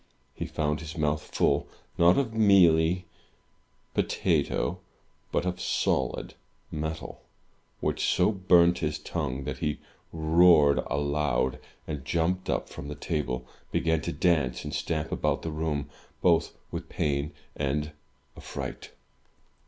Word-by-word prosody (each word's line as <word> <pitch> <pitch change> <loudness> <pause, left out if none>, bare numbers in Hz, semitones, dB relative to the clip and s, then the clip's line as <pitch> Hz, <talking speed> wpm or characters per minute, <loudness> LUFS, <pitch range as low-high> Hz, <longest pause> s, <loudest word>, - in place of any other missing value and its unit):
He - - -5
found 75 -1 -1
his 80 +1 -8
mouth 75 0 +1
full, 70 -1 +1 0.3
not 85 +1 +5
of 130 -5 0
mealy 90 -5 +5 0.9
potato, - - 0 0.5
but - - 0
of 90 0 -2
solid 65 -2 0 0.4
metal, 80 +1 -5 0.6
which - - -1
so 90 +3 +3
burnt 90 -3 +4
his 75 0 -1
tongue 75 -4 -3
that - - -5
he 75 -1 -1 0.3
roared 80 -2 +5
aloud, 70 -3 0 0.3
and, 75 -4 -4
jumping 85 +5 0
up - - -1
from 70 - -8
the 75 - -5
table, 70 -5 -2 0.3
began 80 -1 +1
to 85 - -3
dance 80 -8 +1
and - - -5
stamp 80 -2 -2
about - - 0
the 80 - -3
room, 75 -2 -2 0.3
both 85 -2 +2
with - - -5
pain 70 +1 -1 0.2
and 75 +2 -1 0.4
affright. - - -6
80 Hz, 125 wpm, -28 LUFS, 75-85 Hz, 0.9 s, not